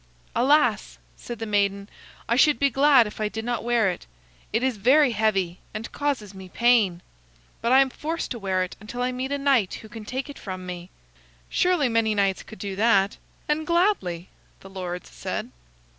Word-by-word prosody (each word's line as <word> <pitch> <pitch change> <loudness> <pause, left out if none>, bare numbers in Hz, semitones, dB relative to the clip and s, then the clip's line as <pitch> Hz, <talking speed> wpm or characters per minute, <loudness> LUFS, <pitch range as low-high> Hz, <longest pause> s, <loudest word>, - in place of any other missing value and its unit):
"Alas!" 290 +5 +2 0.2
said 240 - -8
the 225 - -4
maiden, 200 -1 0 0.4
"I 235 - +2
should 295 +3 +5
be 280 -1 +2
glad 270 -1 +5
if 210 +1 -7
I 210 - 0
did 220 +1 -5
not 240 -2 -2
wear 235 -3 +2
it. 175 - -9 0.4
It 225 +3 0
is 260 -4 0
very 260 +6 +4
heavy, 195 -5 0 0.2
and 215 +2 -5
causes 270 -9 -2
me 190 -1 -11
pain. 220 -6 +2 0.6
But 235 - 0
I 265 +1 +7
am 270 -1 +1
forced 325 +5 -4
to 240 - -4
wear 190 -2 0
it 185 - -7
until 235 +4 -5
I 250 - 0
meet 255 +2 -4
a 285 - 0
knight 275 -8 +2
who 220 - -11
can 225 -1 -9
take 260 +6 -4
it 285 - -10
from 185 -2 -6
me." 180 0 -7 0.6
"Surely 360 -6 +2
many 225 -2 +1
knights 195 -2 +1
could 220 - -12
do 200 -2 -5
that, 200 -2 +3 0.3
and 300 +1 -1
gladly," 340 - +1 0.3
the 195 - -13
lords 180 -2 -6
said. - - -5
225 Hz, 190 wpm, -25 LUFS, 195-265 Hz, 0.6 s, I